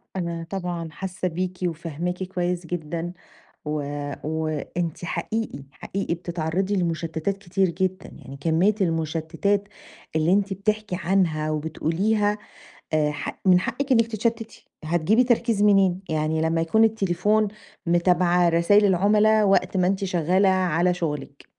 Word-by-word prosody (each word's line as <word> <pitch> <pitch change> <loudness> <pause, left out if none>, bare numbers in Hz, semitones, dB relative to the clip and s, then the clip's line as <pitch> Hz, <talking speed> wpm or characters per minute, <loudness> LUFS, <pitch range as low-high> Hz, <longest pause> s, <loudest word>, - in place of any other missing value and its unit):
أنا 170 -2 -3
طبعًا 175 -4 -4
حاسة 185 +2 -4
بيكِ، 180 +1 -3
وفاهماكِ 170 +1 -3
كويس 180 -1 -2
جدًا، 170 +1 -4 0.5
و 150 -1 -2 0.4
وأنتِ 160 +2 -3
حقيقي، 170 -4 -3
حقيقي 190 +7 -4
بتتعرّضي 175 +3 -2
لمشتَّتات 170 +1 -1
كتير 190 -1 0
جدًا، 185 +2 -2
يعني 135 +1 -11
كمية 170 +7 +2
المشتَّتات 165 +4 0 0.5
اللي 160 +3 +3
أنتِ 200 0 +1
بتحكي 210 0 -1
عنها 165 -4 +1
وبتقوليها 190 +7 0 0.6
آآ، 150 -1 +2
حق 150 - -6
من 180 -1 +6
حقِّك 275 +8 -3
إنِّك 230 -2 +4
تتشتِّتي، 225 0 -3 0.2
هتجيبي 175 +9 +3
تركيز 235 -3 +2
منين؟ 195 -3 +4
يعني 155 0 0
لمّا 165 +1 +1
يكون 220 +7 +3
التليفون 210 0 +2 0.4
متابعة 175 0 +3
رسايل 170 +5 +4
العملا 210 +3 +4
وقت 190 -1 +2
ما 180 -1 +3
أنتِ 195 +1 0
شغالة 185 +1 +2
على 180 -1 +2
شغلِك، 150 -5 -5
180 Hz, 125 wpm, -24 LUFS, 165-195 Hz, 0.6 s, من